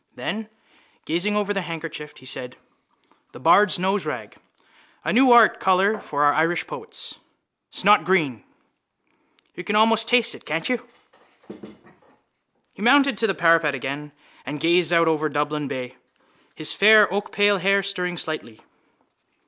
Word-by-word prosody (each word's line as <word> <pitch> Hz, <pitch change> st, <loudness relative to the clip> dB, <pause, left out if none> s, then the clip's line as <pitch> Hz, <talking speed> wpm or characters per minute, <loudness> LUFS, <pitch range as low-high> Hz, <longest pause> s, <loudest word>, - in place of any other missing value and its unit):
Then, 220 Hz, 0 st, -5 dB, 0.6 s
gazing 180 Hz, +6 st, -1 dB
over 205 Hz, -1 st, -1 dB
the 195 Hz, -, -2 dB
handkerchief, 160 Hz, -3 st, -8 dB
he 130 Hz, -, -17 dB
said: 130 Hz, -1 st, -6 dB, 0.8 s
—The -, -, -11 dB
bard's 205 Hz, -1 st, +4 dB
noserag! 190 Hz, +3 st, -3 dB, 0.7 s
A -, -, -2 dB
new 255 Hz, +1 st, +4 dB
art 235 Hz, -2 st, +6 dB
colour 190 Hz, +3 st, +2 dB
for 145 Hz, 0 st, -3 dB
our 145 Hz, 0 st, +4 dB
Irish 165 Hz, +3 st, 0 dB
poets: -, -, -9 dB, 0.5 s
snotgreen. 175 Hz, -, +2 dB, 1.1 s
You 180 Hz, -, -9 dB
can 205 Hz, +4 st, -3 dB
almost 225 Hz, +1 st, +3 dB
taste 240 Hz, -1 st, +3 dB
it, -, -, -14 dB
can't 160 Hz, +2 st, -3 dB
you? 250 Hz, -2 st, -3 dB, 1.9 s
He -, -, -14 dB
mounted 275 Hz, +3 st, +4 dB
to 225 Hz, -, +1 dB
the 195 Hz, -, -1 dB
parapet 165 Hz, -4 st, +2 dB
again 140 Hz, +3 st, -6 dB, 0.3 s
and 150 Hz, +1 st, -6 dB
gazed 170 Hz, +1 st, +2 dB
out 165 Hz, -1 st, +3 dB
over 155 Hz, -1 st, 0 dB
Dublin 150 Hz, 0 st, -2 dB
bay, 130 Hz, -1 st, -7 dB, 0.6 s
his 155 Hz, -2 st, -2 dB
fair 215 Hz, +1 st, +6 dB
oakpale 205 Hz, 0 st, +1 dB
hair 195 Hz, +1 st, +2 dB
stirring 180 Hz, -2 st, -3 dB
slightly. 155 Hz, -9 st, -5 dB
180 Hz, 135 wpm, -22 LUFS, 150-210 Hz, 1.9 s, art